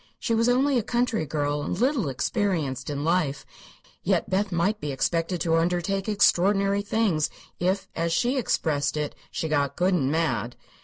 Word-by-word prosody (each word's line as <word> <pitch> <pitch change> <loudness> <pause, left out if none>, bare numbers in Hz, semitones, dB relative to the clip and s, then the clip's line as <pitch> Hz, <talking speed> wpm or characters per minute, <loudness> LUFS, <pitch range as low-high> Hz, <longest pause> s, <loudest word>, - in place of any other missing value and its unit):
She 230 - -1
was 230 +2 +3
only 260 +1 +3
a - - 0
country 235 -6 0
girl, 145 0 -1
and 160 - -3
little 245 - +1
experienced 145 - -1
in 145 -1 -3
life, 155 -5 0 0.6
yet - - 0
Beth 195 +1 +1
might 195 +5 0
be 145 - -3
expected 165 +6 -1
to 165 -1 +2
undertake 180 +4 0
extraordinary 200 0 +3
things 200 -7 +1 0.3
if, 190 +2 0
as 165 0 -1
she 240 +11 +1
expressed 155 - 0
it, 150 -1 -2
if - - -29
she 160 - -3
"got 145 -3 0
good 185 +2 +2
and 140 -6 +1
mad!" 125 -8 -1
175 Hz, 170 wpm, -25 LUFS, 150-205 Hz, 0.6 s, was